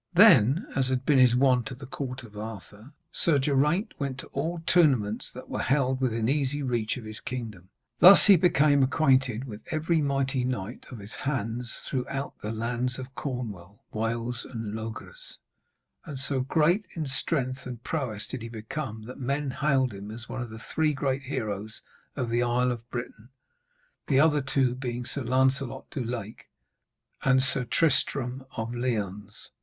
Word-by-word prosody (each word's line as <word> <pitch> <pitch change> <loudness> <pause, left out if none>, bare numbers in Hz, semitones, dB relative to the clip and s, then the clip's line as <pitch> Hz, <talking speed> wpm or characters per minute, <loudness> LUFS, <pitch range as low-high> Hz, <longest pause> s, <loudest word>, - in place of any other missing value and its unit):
Then, 130 - +7
as 130 -2 +2
had 130 0 -1
been 145 -3 +4
his 125 -2 +6
wont 125 -2 +3
at 125 - -7
the 135 - -9
court 130 -1 -5
of 105 -3 -13
Arthur, 105 +2 -8 0.2
Sir 165 -4 +2
Geraint 150 +9 +1
went 140 -2 -2
to - - -8
all 165 +5 -2
tournaments 130 - +3
that - - -10
were - - -3
held 130 -1 +1
within 115 -3 0
easy 145 +1 0
reach 120 -3 -1
of 125 - -8
his 110 0 -6
kingdom. 110 -8 -6 0.3
Thus 190 +2 +9
he 200 - +9
became 150 -5 +4
acquainted 130 -4 +2
with 110 -5 -8
every 160 0 +1
mighty 135 -2 0
knight 125 -3 -4
of 125 - -8
his 105 +1 -9
hands 120 -3 -3
throughout 135 +1 -3
the 105 - -3
lands 120 +3 -2
of 130 0 -8
Cornwall, 105 -9 -6
Wales 115 +2 -2
and 115 -4 -5
Logres; 115 - -7 0.7
and 145 -4 -7
so 135 0 -1
great 165 +9 +2
in 160 -2 -2
strength 135 -1 -2
and 120 -2 -7
prowess 125 -10 -3
did 130 - -6
he 115 - -6
become 110 +1 -5
that 125 +5 -9
men 140 +2 -1
hailed 135 -3 +1
him 100 +1 -8
as 115 +2 -8
one - - -4
of 120 - -5
the 110 - -9 0.2
Three 155 -1 +2
Great 135 0 -1
Heroes 110 -5 -4 0.3
of 120 -2 -2
the 120 +1 +2
Isle 125 +1 +2
of 120 0 -7
Britain; 120 -1 -6 0.8
the 135 -2 +4
other 150 -1 +4
two 130 -2 +1
being 125 -1 -4
Sir 140 - -3
Lancelot 130 +1 0
du 135 - -3
Lake 115 -2 -6 0.8
and 135 -1 +4
Sir 135 -1 +3
Tristram 135 -2 +1
of 115 +1 -3
Lyones. 105 -4 -3
130 Hz, 170 wpm, -27 LUFS, 115-140 Hz, 0.8 s, Thus